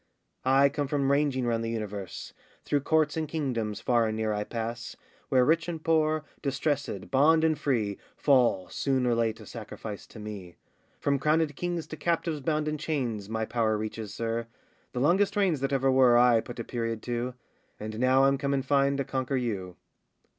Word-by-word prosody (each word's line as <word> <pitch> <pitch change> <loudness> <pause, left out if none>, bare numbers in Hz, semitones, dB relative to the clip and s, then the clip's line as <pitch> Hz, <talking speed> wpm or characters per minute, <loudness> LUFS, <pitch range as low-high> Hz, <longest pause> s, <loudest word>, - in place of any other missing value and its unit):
I 135 +2 +5
come 140 0 -2
from 140 -1 +1
ranging 140 -3 +1
round 115 -1 0
the 115 - -2
universe, 105 -4 -5 0.3
Through 145 - +1
courts 155 +1 +2
and 160 -1 -2
kingdoms 125 -9 -2
far 120 -2 +2
and 110 0 -2
near 110 -1 0
I 105 0 -1
pass, 115 +1 -5 0.3
Where 130 -1 +4
rich 165 +3 +2
and 160 -2 -5
poor, 155 -1 +2 0.2
distressèd, 140 -7 -2
bond 160 +4 +5
and 160 -1 +3
free, 120 -9 -1 0.2
Fall 125 -10 +3
soon 135 -2 0
or 120 - +3
late 115 -1 0
a - - -11
sacrifice 110 -2 -8
to - - -14
me. 105 -5 -8 0.4
From 140 -1 +1
crownèd 155 0 +2
kings 175 -1 -3
to 155 - -8
captives 165 -2 -1
bound 155 +2 0
in 155 0 -2
chains 125 -10 -2
My 110 0 -1
power 110 -1 +1
reaches, 110 0 -5
sir; 115 +1 -3 0.4
the 125 - -3
longest 190 +9 +3
reigns 190 -8 +2
That 135 +1 -1
ever 135 -1 +2
were, 130 -2 +6
I 120 -1 +6
put 120 - -9
a 115 - -3
period 115 -2 -3
to; 120 +1 -3 0.4
And 110 +1 -5
now 130 +2 +4
I'm 135 0 +3
come 140 0 0
in 135 - -1
fine 140 0 +2
to 140 - 0
conquer 130 +1 -2
you. 100 -8 -3
130 Hz, 190 wpm, -28 LUFS, 115-145 Hz, 0.4 s, were